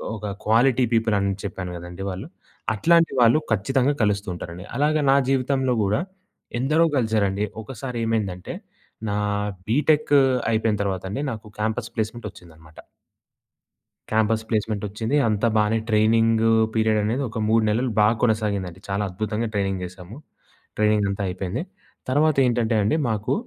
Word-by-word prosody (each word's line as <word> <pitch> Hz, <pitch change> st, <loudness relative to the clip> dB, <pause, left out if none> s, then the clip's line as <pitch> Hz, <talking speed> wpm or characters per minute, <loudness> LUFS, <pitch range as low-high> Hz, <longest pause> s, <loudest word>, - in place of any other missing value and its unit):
ఒక 105 Hz, -1 st, -5 dB
quality 120 Hz, +3 st, +4 dB
people 110 Hz, -2 st, +2 dB
అని 100 Hz, 0 st, 0 dB
చెప్పాను 95 Hz, -3 st, -5 dB
గదండీ 90 Hz, +3 st, -8 dB
వాళ్ళు. 95 Hz, +10 st, -6 dB, 0.5 s
అట్లాంటి 165 Hz, +8 st, +3 dB
వాళ్ళు 120 Hz, +6 st, +5 dB
ఖచ్చితంగా 130 Hz, +7 st, +2 dB
కలుస్తూ 100 Hz, 0 st, 0 dB
ఉంటారండి. 85 Hz, +2 st, -8 dB
అలాగ 150 Hz, +2 st, +2 dB, 0.2 s
నా -, -, +5 dB
జీవితంలో 130 Hz, -1 st, +1 dB
గూడా 100 Hz, +2 st, +1 dB, 0.6 s
ఎందరో 155 Hz, +6 st, +3 dB
కలిసారండి. 105 Hz, -3 st, +1 dB, 0.2 s
ఒకసారి 125 Hz, +1 st, -6 dB
ఏమైందంటే, 100 Hz, -5 st, -2 dB, 0.6 s
నా 100 Hz, -, -1 dB, 0.5 s
బీటెక్కూ 145 Hz, +2 st, +3 dB, 0.3 s
అయిపోయిన 110 Hz, -1 st, +1 dB
తర్వాతండి 95 Hz, +6 st, -3 dB
నాకు 110 Hz, -1 st, -8 dB
క్యాంపస్ 110 Hz, +2 st, -2 dB
ప్లేస్‌మెంట్ 110 Hz, 0 st, -3 dB
ఒచ్చిందనమాట. 80 Hz, -4 st, -17 dB, 1.3 s
క్యాంపస్ 110 Hz, 0 st, +2 dB
ప్లేస్‌మెంటొచ్చింది. 110 Hz, +3 st, -1 dB
అంతా 110 Hz, +2 st, +1 dB
బానే 105 Hz, +1 st, +2 dB
ట్రైనింగ్ 115 Hz, +1 st, +3 dB, 0.3 s
పీరియడనేది 110 Hz, +3 st, +1 dB
ఒక 115 Hz, -, -5 dB
3 110 Hz, 0 st, +4 dB
నెలలు 120 Hz, +3 st, 0 dB
బాగా 105 Hz, +2 st, +4 dB
కొనసాగిందండి. 100 Hz, -6 st, 0 dB
చాలా 100 Hz, +1 st, 0 dB
అద్భుతంగా 110 Hz, +4 st, -2 dB
ట్రైనింగ్ 95 Hz, -2 st, -1 dB
జేసాము. 95 Hz, +5 st, -11 dB, 0.6 s
ట్రైనింగంతా 105 Hz, -2 st, +1 dB
అయిపోయింది. 90 Hz, 0 st, -3 dB, 0.5 s
తర్వాత 150 Hz, +3 st, +3 dB
ఏంటంటే 120 Hz, -2 st, +1 dB
అండి 105 Hz, -, +2 dB
మాకు 110 Hz, -1 st, -1 dB
110 Hz, 125 wpm, -23 LUFS, 100-120 Hz, 1.3 s, వాళ్ళు